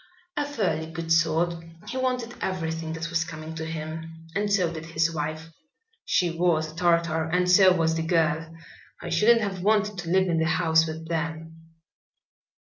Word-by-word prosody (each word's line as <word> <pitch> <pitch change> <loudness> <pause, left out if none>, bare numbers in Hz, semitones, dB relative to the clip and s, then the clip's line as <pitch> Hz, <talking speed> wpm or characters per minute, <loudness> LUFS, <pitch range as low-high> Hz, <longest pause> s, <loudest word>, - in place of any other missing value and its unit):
"A 290 -1 -1
fairly 165 - -2
good 165 0 -5
sort. 165 +1 +2 0.2
He - - -6
wanted 250 -2 -1
everything 165 -3 -3
that 165 +1 -5
was 165 -1 +1
coming 160 0 -8
to 160 0 -5
him, 160 +1 -7
and 205 +1 0
so 180 -4 +2
did 165 0 -7
his 165 0 0
wife. 155 +1 -4 0.5
She 175 -2 +2
was 165 -2 +1
a - - -16
tartar 170 -2 +2
and 180 +3 +1
so 185 +1 +7
was 165 -2 +2
the 165 - -1
girl. 160 -1 +1 0.5
I 175 - -6
shouldn't 220 +7 +4
have 195 -3 -3
wanted 210 0 +1
to 170 -2 -5
live 190 +1 +3
in 165 -2 +1
the 160 - +1
house 165 -1 +3
with 160 +1 -6
them." 160 0 -4
165 Hz, 175 wpm, -26 LUFS, 160-180 Hz, 0.5 s, so